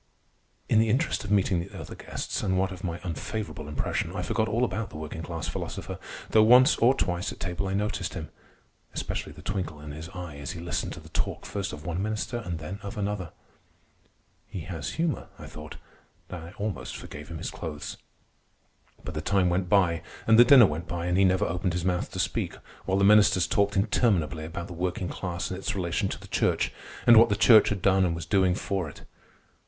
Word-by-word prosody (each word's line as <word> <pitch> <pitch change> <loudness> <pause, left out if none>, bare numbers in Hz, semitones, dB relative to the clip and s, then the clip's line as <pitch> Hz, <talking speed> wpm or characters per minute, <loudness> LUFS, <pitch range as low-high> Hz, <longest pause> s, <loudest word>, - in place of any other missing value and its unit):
In 110 - +4
the 110 0 +3
interest 135 +10 +1
of 100 - -6
meeting 100 -3 +3
the 90 +3 -7
other - - -8
guests, - - -4
and 95 -1 +1
what 95 0 +1
of 90 -1 -9
my 85 -2 -3
unfavorable 90 -1 -4
impression, 75 -2 -2
I - - -2
forgot 110 - 0
all 115 +4 +2
about 115 -3 -3
the - - -9
working 80 +1 -6
class 80 -1 -5
philosopher, - - -5 0.3
though 110 - +6
once 125 +6 +7
or 125 +4 +5
twice 90 -4 -1
at - - -10
table 90 +1 -3
I 95 - -1
noticed 100 -3 -2
him—especially - - -7
the - - -13
twinkle 90 -6 -3
in 75 0 -8
his 80 +3 -8
eye 90 -5 -7
as 70 - -5
he 85 - -7
listened 85 +1 -3
to - - -9
the - - -14
talk - - -2
first 100 0 -3
of 75 +1 -9
one 85 +1 -2
minister 110 +3 -2
and 90 -7 -4
then 80 +6 -6
of 100 0 -7
another. 100 -4 -2 1.2
He 95 - -6
has 80 -4 -5
humor, 165 -2 -1
I - - -10
thought, 75 0 -9 0.5
and 85 -2 -6
I 85 - -11
almost 105 -1 -4
forgave 75 0 -9
him 85 - -6
his 85 - -4
clothes. 75 -3 -6 1.1
But - - -6
the - - -3
time 95 -3 +2
went 90 0 0
by, 85 -5 +3 0.2
and 110 0 +6
the - - +11
dinner 125 -1 +9
went 80 -1 -3
by, 85 -1 -3
and 90 0 +1
he 95 +1 +5
never 95 0 +3
opened 90 +1 -1
his 90 0 -2
mouth 90 -1 0
to - - -5
speak, - - -1 0.3
while 95 - +1
the 100 - +2
ministers 100 -3 +6
talked 100 0 +1
interminably 95 -7 +1
about 85 +1 -5
the 95 - -8
working 90 +1 -2
class 85 -2 -4
and 95 - -4
its 95 - -2
relation 85 -3 -1
to - - -5
the - - -12
church, - - +1 0.3
and 120 -1 +8
what 115 +1 +8
the 100 - +2
church 110 0 +7
had 100 -4 -3
done 95 -1 +4
and 85 -2 +1
was 80 -1 -5
doing 95 0 +3
for 95 -5 -2
it. - - -13
95 Hz, 215 wpm, -27 LUFS, 85-105 Hz, 1.2 s, the